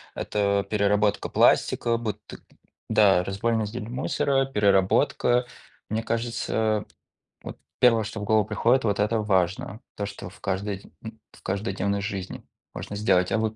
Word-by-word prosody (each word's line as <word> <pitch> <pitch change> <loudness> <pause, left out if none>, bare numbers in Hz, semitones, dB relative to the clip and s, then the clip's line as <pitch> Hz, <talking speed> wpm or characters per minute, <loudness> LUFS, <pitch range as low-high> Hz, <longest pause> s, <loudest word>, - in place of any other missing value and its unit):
это 100 -1 0
переработка 105 0 +1
пластика, 115 0 +3
буты 105 -3 -6 0.5
да, 95 -4 +4
разболь 100 +5 -1
раздельно 110 +1 -4
мусора, 135 +2 0
переработка. 105 +2 +2 0.4
Мне 110 +1 -2
кажется, 110 -2 -1 0.6
вот - - -8 0.2
1, 115 -3 +5
что 110 -1 -6
в - - -4
голову 110 -1 +2
приходит, 115 +4 +2
вот 100 -1 0
это 110 +2 +1
важно, 95 0 -1
то, 100 - -3
что 100 -3 -8
в 95 - -18
каждой 100 0 -3 0.2
м 110 0 -9
в - - -19
каждодневной 100 0 -2
жизни 100 -2 -5 0.3
можно 100 - -7
сделать. 95 -3 +2
А - - +2
вот. 110 0 -1
105 Hz, 140 wpm, -25 LUFS, 100-115 Hz, 0.6 s, 1